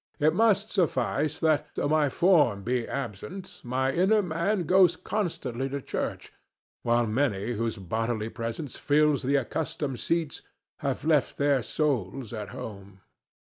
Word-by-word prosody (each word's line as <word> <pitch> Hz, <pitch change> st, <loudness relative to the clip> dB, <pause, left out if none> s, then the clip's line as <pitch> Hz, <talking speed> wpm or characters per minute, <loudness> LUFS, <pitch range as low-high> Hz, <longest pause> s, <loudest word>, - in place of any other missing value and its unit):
It 155 Hz, 0 st, +3 dB
must 215 Hz, -1 st, +3 dB
suffice 150 Hz, -2 st, 0 dB
that, 155 Hz, -2 st, +1 dB
though -, -, 0 dB
my 150 Hz, -1 st, +3 dB
form 145 Hz, -, +3 dB
be 120 Hz, +1 st, -1 dB
absent, 180 Hz, -, -6 dB
my 130 Hz, +2 st, 0 dB
inner 195 Hz, +7 st, +3 dB
man 175 Hz, +3 st, 0 dB
goes 185 Hz, +2 st, +5 dB
constantly 135 Hz, -, -3 dB
to 140 Hz, +1 st, -3 dB
church, -, -, -4 dB, 0.5 s
while 120 Hz, 0 st, +2 dB
many 110 Hz, -2 st, 0 dB
whose 115 Hz, 0 st, -2 dB
bodily 110 Hz, +4 st, -2 dB
presence 115 Hz, +5 st, -5 dB
fills 150 Hz, -1 st, +3 dB
the 140 Hz, +3 st, +1 dB
accustomed 140 Hz, 0 st, -2 dB
seats 165 Hz, -3 st, -1 dB, 0.4 s
have 140 Hz, 0 st, -2 dB
left 155 Hz, -4 st, +2 dB
their 140 Hz, -2 st, +3 dB
souls 125 Hz, -, -2 dB
at 105 Hz, -4 st, -5 dB
home. 100 Hz, -2 st, -9 dB
140 Hz, 140 wpm, -27 LUFS, 115-160 Hz, 0.5 s, goes